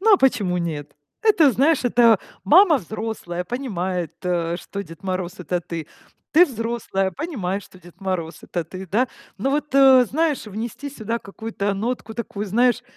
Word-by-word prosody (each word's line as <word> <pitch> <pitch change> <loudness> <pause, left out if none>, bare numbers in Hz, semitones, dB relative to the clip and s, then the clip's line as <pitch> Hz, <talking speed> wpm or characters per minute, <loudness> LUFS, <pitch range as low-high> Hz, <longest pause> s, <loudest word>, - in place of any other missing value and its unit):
Ну 440 +2 +5
а - - +5
почему 210 - +2
нет? 150 -4 -4 0.3
Это, 335 -10 +5
знаешь, 280 +4 +3
это 235 -3 +5 0.3
мама 325 - +6
взрослая, 205 -3 -5
понимает, 185 - -3
э, 175 -2 0
что 200 +2 -6
Дед 165 -3 -13
Мороз- 185 -1 -3
это 180 0 -2
ты. 165 -2 -6 0.5
Ты 350 +3 +7
взрослая, 230 -6 -2
понимаешь, 205 - -3
что 185 - -17
Дед 175 +1 -17
Мороз- 175 -4 -3
это 175 -2 -3
ты, 185 +4 -8
да? 225 +8 +2 0.3
Ну, 245 +7 -1
вот, 295 0 -2
э, 265 -2 +8
знаешь, 300 +1 0
внести 225 +7 -5
сюда 235 -4 -3
какую-то 205 -1 -4
нотку 225 +2 -3
такую, 215 -3 -4
знаешь, 240 +4 +2
215 Hz, 160 wpm, -22 LUFS, 180-255 Hz, 0.5 s, э